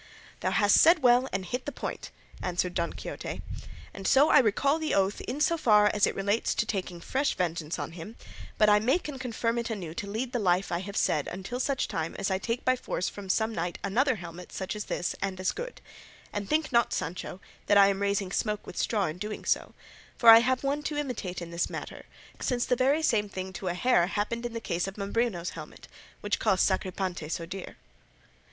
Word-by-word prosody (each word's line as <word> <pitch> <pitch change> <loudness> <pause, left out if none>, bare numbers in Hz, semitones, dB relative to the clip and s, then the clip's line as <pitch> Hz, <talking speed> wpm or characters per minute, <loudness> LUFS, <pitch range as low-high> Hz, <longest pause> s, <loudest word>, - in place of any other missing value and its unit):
"Thou - - 0
hast 205 -1 +4
said 330 -2 +6
well 250 +1 +5
and 190 0 -2
hit 250 +9 -4
the - - -1
point," - - -6 0.3
answered 180 0 -1
Don 170 -2 -1
Quixote; - - -6 0.5
and 195 -1 -5
so 275 +3 +5
I - - +7
recall 275 +7 +2
the 315 -1 0
oath 195 +1 +1
in 280 - -4
so 335 +3 +2
far 210 -5 +5
as 205 - +3
relates 200 +3 0
to - - +1
taking 185 -5 -3
fresh 270 +10 -1
vengeance 170 -3 -2
on - - -4
him, 175 +7 -9 0.4
but 215 - +5
I 210 0 +6
make 260 +12 +1
and 270 -3 -6
confirm 235 -1 -1
it 235 0 -3
anew 185 -8 -5
to 200 +4 -5
lead 235 +4 -3
the 245 - 0
life 185 -2 +1
I 170 - 0
have 200 +2 -6
said 150 -2 +1
until 195 +7 -5
such 270 +1 0
time 160 0 -3
as 195 - -1
I 190 - +1
take 230 +4 -3
by 255 - +4
force 215 -6 -3
from 200 -2 -9
some 220 +3 +1
knight 175 -2 -3
another 255 +6 +2
helmet 175 -2 -9
such 190 +2 -4
as 210 - -4
this 175 - -2
and 190 -1 -2
as 185 - +1
good; 485 +3 -7 0.5
and 205 -1 -4
think 310 0 +1
not, 235 -1 +3
Sancho, 175 +3 -4 0.3
that 205 - +5
I 200 0 +7
am 195 0 -1
raising 200 -1 0
smoke 210 +1 -1
with - - -10
straw 210 -4 +1
in 155 +2 -4
doing 210 +2 -5
so, - - 0 0.4
for 235 - +6
I 225 0 +12
have 255 +2 +1
one 280 +2 0
to 295 0 -3
imitate 220 -11 -3
in 170 - -9
the 170 +1 -1
matter, - - -7 0.3
since 245 -2 0
the 250 - +2
very 275 +5 +2
same 210 -8 +2
thing 190 0 -6
to 185 +1 -6
a 175 - -1
hair 180 -4 +3
happened 230 +4 -2
in 240 - -11
the 230 - -3
case 175 -3 -2
of 195 - -7
Mambrino's 200 -3 -1
helmet, 155 -2 -10 0.3
which 205 0 -1
cost 195 -4 +3
Sacripante 185 -4 -2
so 165 +1 -3
dear." 185 +2 -8
205 Hz, 220 wpm, -28 LUFS, 185-245 Hz, 0.5 s, I